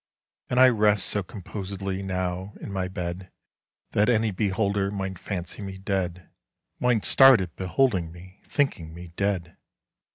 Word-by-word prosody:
And 125 Hz, -, +1 dB
I 130 Hz, -, +9 dB
rest 105 Hz, -3 st, +3 dB
so 105 Hz, -, 0 dB
composedlyNow, 95 Hz, -1 st, -4 dB
in 100 Hz, -, -8 dB
my 95 Hz, -1 st, -1 dB
bed, 90 Hz, 0 st, -5 dB, 0.6 s
That 105 Hz, +3 st, +3 dB
any 110 Hz, -2 st, +2 dB
beholderMight 100 Hz, -1 st, -1 dB
fancy 90 Hz, -1 st, -5 dB
me 95 Hz, -1 st, -6 dB
dead—Might 95 Hz, +5 st, -3 dB
start 135 Hz, -3 st, +7 dB
at 90 Hz, -3 st, -5 dB
beholding 95 Hz, -3 st, +1 dB
me, 90 Hz, +3 st, -14 dB
Thinking 85 Hz, -, -1 dB
me 85 Hz, 0 st, -9 dB
dead. 95 Hz, -4 st, -1 dB
95 Hz, 125 wpm, -26 LUFS, 90-105 Hz, 0.6 s, I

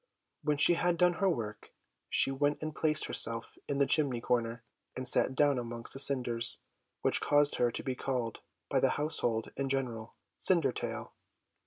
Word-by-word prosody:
When 150 Hz, -1 st, -2 dB
she 160 Hz, -, +8 dB
had 175 Hz, 0 st, -1 dB
done 180 Hz, 0 st, +2 dB
her 195 Hz, -, +2 dB
work, 105 Hz, -, -7 dB, 0.3 s
she 135 Hz, -, +3 dB
went 145 Hz, +2 st, -2 dB
and 155 Hz, 0 st, -5 dB
placed 155 Hz, -1 st, +2 dB
herself 115 Hz, 0 st, +1 dB
in 140 Hz, -, -3 dB
the 140 Hz, -, +2 dB
chimney 135 Hz, -5 st, +1 dB
corner, 115 Hz, 0 st, -3 dB, 0.3 s
and 130 Hz, 0 st, -4 dB
sat 130 Hz, +1 st, +4 dB
down 145 Hz, -1 st, +1 dB
amongst 115 Hz, -1 st, -5 dB
the 135 Hz, -, -4 dB
cinders, 120 Hz, -4 st, +4 dB, 0.5 s
which -, -, +1 dB
caused 145 Hz, 0 st, +1 dB
her 120 Hz, -, +1 dB
to -, -, -5 dB
be 130 Hz, -, -4 dB
called 125 Hz, -3 st, -5 dB, 0.3 s
by -, -, -1 dB
the -, -, +1 dB
household 120 Hz, -7 st, -2 dB
in 135 Hz, -1 st, -3 dB
general 120 Hz, -4 st, -4 dB, 0.2 s
Cindertail. 165 Hz, -9 st, +1 dB
135 Hz, 170 wpm, -29 LUFS, 120-145 Hz, 0.5 s, she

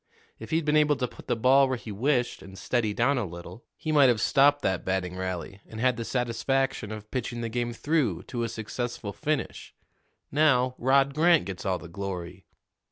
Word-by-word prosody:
If -, -, -9 dB
he'd 160 Hz, -1 st, 0 dB
been 150 Hz, 0 st, +2 dB
able 150 Hz, -1 st, +4 dB
to 125 Hz, -1 st, -2 dB
put -, -, -15 dB
the -, -, +1 dB
ball 135 Hz, +4 st, +5 dB
where 130 Hz, -1 st, -1 dB
he 115 Hz, -, -9 dB
wished 125 Hz, +4 st, 0 dB
and 95 Hz, 0 st, -12 dB
steady 115 Hz, 0 st, 0 dB
down 125 Hz, +6 st, +1 dB
a -, -, -1 dB
little, 85 Hz, +5 st, -9 dB
he 155 Hz, -, -3 dB
might 145 Hz, -3 st, +6 dB
have 120 Hz, -3 st, +2 dB
stopped 145 Hz, +5 st, +4 dB
that 95 Hz, -2 st, 0 dB
batting 95 Hz, -1 st, -2 dB
rally 95 Hz, +1 st, -5 dB
and 110 Hz, -, -9 dB
had 125 Hz, +1 st, +2 dB
the 115 Hz, -, -4 dB
satisfaction 125 Hz, -1 st, -1 dB
of 105 Hz, 0 st, -8 dB
pitching 120 Hz, -2 st, -3 dB
the 115 Hz, -, -3 dB
game 120 Hz, +1 st, -2 dB
through 150 Hz, +4 st, 0 dB
to 120 Hz, -, -5 dB
a 115 Hz, -, -1 dB
successful 110 Hz, -1 st, -5 dB
finish. 150 Hz, +3 st, -3 dB, 0.6 s
Now, 130 Hz, -4 st, +3 dB
Rod 135 Hz, +2 st, +3 dB
Grant 165 Hz, -, +4 dB
gets 95 Hz, 0 st, -6 dB
all 95 Hz, -1 st, +1 dB
the 90 Hz, -, -10 dB
glory." 90 Hz, -1 st, -6 dB
120 Hz, 200 wpm, -27 LUFS, 100-135 Hz, 0.6 s, might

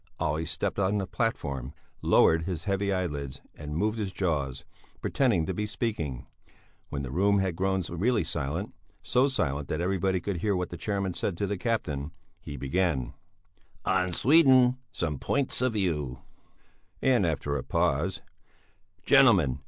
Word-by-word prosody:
Olle 80 Hz, +1 st, -1 dB
stepped 85 Hz, +4 st, -2 dB
on 100 Hz, +1 st, +2 dB
the 100 Hz, -, -1 dB
platform, 70 Hz, -, -2 dB, 0.3 s
lowered 80 Hz, 0 st, +4 dB
his 85 Hz, -3 st, -3 dB
heavy 100 Hz, +1 st, 0 dB
eyelids 75 Hz, -8 st, -3 dB
and 75 Hz, +1 st, -6 dB
moved 110 Hz, +4 st, 0 dB
his 100 Hz, -3 st, -2 dB
jaws, 70 Hz, -9 st, -2 dB, 0.3 s
pretending 115 Hz, -, +1 dB
to 95 Hz, -, -2 dB
be 105 Hz, +3 st, -2 dB
speaking; 100 Hz, -, -3 dB, 0.6 s
when 70 Hz, 0 st, -3 dB
the 65 Hz, -, -5 dB
room 100 Hz, +6 st, +3 dB
had 95 Hz, -3 st, 0 dB
grown 95 Hz, +1 st, 0 dB
really 105 Hz, +5 st, +1 dB
silent, 80 Hz, +5 st, -3 dB, 0.3 s
so 130 Hz, +2 st, +3 dB
silent 70 Hz, -, -1 dB
that 75 Hz, -, -2 dB
everybody 95 Hz, +1 st, +1 dB
could 95 Hz, +1 st, -3 dB
hear 100 Hz, +3 st, 0 dB
what 90 Hz, -1 st, -2 dB
the -, -, -5 dB
chairman 100 Hz, 0 st, -2 dB
said 85 Hz, 0 st, -2 dB
to 100 Hz, -, 0 dB
the 100 Hz, +1 st, -2 dB
captain, 80 Hz, -, -2 dB, 0.3 s
he 70 Hz, -, -8 dB
began: 70 Hz, -2 st, 0 dB, 0.7 s
"On 90 Hz, 0 st, +1 dB
Sweden. 130 Hz, -, +5 dB
Some 75 Hz, -5 st, -2 dB
points 140 Hz, -3 st, 0 dB
of 130 Hz, -2 st, +1 dB
view." 75 Hz, -, -2 dB, 0.8 s
And 125 Hz, -5 st, +4 dB
after 75 Hz, -3 st, -1 dB
a 70 Hz, -, -2 dB
pause: 80 Hz, +11 st, 0 dB, 0.8 s
"Gentlemen! 100 Hz, -, +5 dB
90 Hz, 150 wpm, -28 LUFS, 75-105 Hz, 0.8 s, Sweden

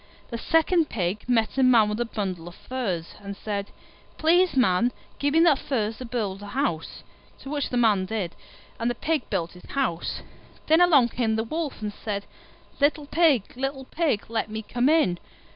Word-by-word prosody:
The 235 Hz, -, -3 dB
second 325 Hz, +2 st, +2 dB
Pig 195 Hz, +4 st, -2 dB
met 235 Hz, +2 st, +1 dB
a -, -, +5 dB
Man 240 Hz, -4 st, +6 dB
with 210 Hz, +2 st, -2 dB
a 240 Hz, -, +1 dB
bundle 190 Hz, -7 st, -4 dB
of 175 Hz, -, -10 dB
furze, 195 Hz, -11 st, -4 dB
and 200 Hz, 0 st, -7 dB
said, 200 Hz, -1 st, -4 dB, 0.5 s
"Please, 345 Hz, 0 st, +3 dB
Man, 235 Hz, 0 st, +3 dB, 0.3 s
give 285 Hz, +1 st, +1 dB
me 325 Hz, -, +6 dB
that 325 Hz, -5 st, +5 dB
furze 220 Hz, -5 st, -2 dB
to 255 Hz, -, -6 dB
build 210 Hz, -5 st, -3 dB
a 205 Hz, -, -8 dB
house"; 225 Hz, -, -2 dB, 0.4 s
which 285 Hz, 0 st, -2 dB
the 245 Hz, -, -1 dB
Man 210 Hz, -5 st, +3 dB
did, 200 Hz, -6 st, -3 dB, 0.4 s
and 230 Hz, +1 st, 0 dB
the 240 Hz, -, -2 dB
Pig 310 Hz, +1 st, -1 dB
built 170 Hz, 0 st, -1 dB
his 180 Hz, -, -15 dB
house. 250 Hz, -12 st, -2 dB, 0.4 s
Then 320 Hz, +3 st, +5 dB
along 290 Hz, -9 st, +6 dB
came 225 Hz, -2 st, 0 dB
the 220 Hz, -, 0 dB
Wolf 295 Hz, -1 st, -4 dB
and 210 Hz, -1 st, -3 dB
said, 200 Hz, -2 st, -4 dB, 0.5 s
"Little 290 Hz, +1 st, +2 dB
Pig, 290 Hz, -, +3 dB
little 270 Hz, +1 st, -3 dB
Pig, 295 Hz, -8 st, 0 dB
let 225 Hz, -1 st, -2 dB
me 220 Hz, +1 st, -5 dB
come 245 Hz, +5 st, +1 dB
in." 300 Hz, -, +3 dB
235 Hz, 185 wpm, -25 LUFS, 205-285 Hz, 0.5 s, Man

